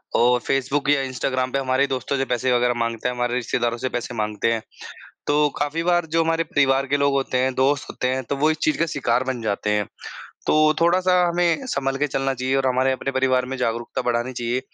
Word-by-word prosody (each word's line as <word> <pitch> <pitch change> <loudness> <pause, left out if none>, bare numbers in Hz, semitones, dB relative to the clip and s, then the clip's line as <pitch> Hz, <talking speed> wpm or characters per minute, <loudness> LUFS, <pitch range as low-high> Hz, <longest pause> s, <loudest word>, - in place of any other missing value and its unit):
और 125 +1 +4
फ़ेसबुक 135 +4 -1
या 145 -1 +4
इंस्टाग्राम 130 0 -2
पे 135 - 0
हमारे 130 +1 +1
दोस्तों 135 +1 -2
से 135 - 0
पैसे 125 0 0
वग़ैरह 125 0 +2
माँगते 115 0 -2
हैं, 125 - -4
हमारे 120 0 -1
रिश्तेदारों 120 -1 -1
से 130 +2 -3
पैसे 120 -1 -4
माँगते 105 +1 -1
हैं। 115 - -2 0.7
तो 150 0 +3
काफ़ी 145 +3 -1
बार 175 -1 +2
जो 165 - +3
हमारे 165 0 +1
परिवार 135 -2 +2
के 145 - +1
लोग 140 0 +2
होते 135 -2 0
हैं, 130 0 +1
दोस्त 135 +2 +1
होते 125 - -2
हैं। 130 +1 -1
तो 140 - -3
वो 150 +3 +2
इस 155 - 0
चीज़ 155 - +1
का 165 - +2
शिकार 125 -5 0
बन 130 -2 -3
जाते 105 -1 -1
हैं। 105 0 +1 0.6
तो 155 0 +4
थोड़ा-सा 180 +2 +3
हमें 175 +8 +1
सँभल 135 - -1
के 145 +2 0
चलना 135 -1 -1
चाहिए 130 +1 -1
और 135 -1 +1
हमारे 130 +1 +2
अपने 130 +1 -2
परिवार 130 -1 +1
में 130 +1 -5
जागरूकता 120 -1 -2
बढ़ानी 120 +1 -1
चाहिए 120 +1 -1
130 Hz, 225 wpm, -22 LUFS, 125-145 Hz, 0.7 s, और